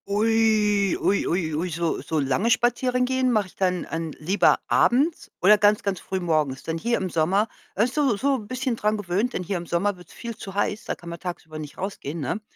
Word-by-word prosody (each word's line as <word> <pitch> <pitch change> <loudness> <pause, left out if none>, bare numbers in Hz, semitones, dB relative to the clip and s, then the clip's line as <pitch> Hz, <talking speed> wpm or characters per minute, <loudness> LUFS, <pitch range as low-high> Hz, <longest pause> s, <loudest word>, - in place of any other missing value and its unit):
Ui, 210 -2 +2
ui, 200 - +1
ui, 165 -3 -1
ui, 165 +4 -1
so 170 0 -1
so 160 - -3
lange 140 - +1
spazieren 250 +1 +2
gehen 260 0 +1
mache 215 -4 +1
ich - - -22
dann 180 -2 0
an 165 -1 -4
lieber 185 +7 +3
abends 285 +7 +2
oder 210 +3 +6
ganz 210 0 +4
ganz 195 -2 -1
früh 190 0 -3
morgens. 155 -6 0
Denn 165 0 -3
hier 235 +6 +1
im 185 -2 -3
Sommer, 185 +7 +2 0.3
man 215 - +3
ist 250 - -4
so 275 -8 +2
so 275 +4 +1
bisschen 250 +3 -3
dran 215 -1 0
gewöhnt, 205 +5 -1
denn - - -2
hier 185 +2 -2
im 175 0 -7
Sommer 185 +4 0
wird's 180 -1 -16
viel 235 -1 -7
zu 195 -2 -9
heiß, 205 +1 -1
da - - -2
kann 170 - -11
man 170 -1 -7
tagsüber 160 -3 -6
nicht 150 -2 -8
rausgehen, 170 -5 -5
ne? 160 +9 -2
200 Hz, 220 wpm, -24 LUFS, 170-225 Hz, 0.3 s, oder